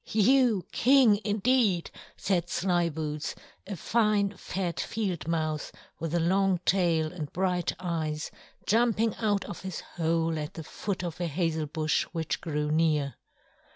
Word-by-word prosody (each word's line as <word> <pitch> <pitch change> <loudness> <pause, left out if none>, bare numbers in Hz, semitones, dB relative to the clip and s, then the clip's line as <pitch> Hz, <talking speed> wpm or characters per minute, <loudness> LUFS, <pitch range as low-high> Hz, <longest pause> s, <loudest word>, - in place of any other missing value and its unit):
"You 225 -3 +3
King, 250 -5 +5
indeed!" 210 -3 +2 0.3
said 175 -3 0
Slyboots, 165 -5 -1 0.3
a 200 - -4
fine, 210 +1 +1
fat 180 -3 -3
Field 190 -8 -2
Mouse 155 -2 -1 0.3
with 165 +1 -2
a - - +3
long 190 +2 +2
tail 170 -4 +2
and 155 -5 -6
bright 180 -1 0
eyes, 160 -4 -2 0.3
jumping 225 0 +2
out 205 -3 0
of - - -7
his 190 -3 -5 0.2
hole 165 -1 +1
at 150 0 -5
the 160 - -6
foot 185 +4 -4
of 175 0 -5
a 175 - 0
hazel 160 -1 -1
bush 155 +1 0
which 165 -2 -2
grew 150 -2 -2
near. 155 -3 +2
175 Hz, 140 wpm, -28 LUFS, 160-200 Hz, 0.3 s, King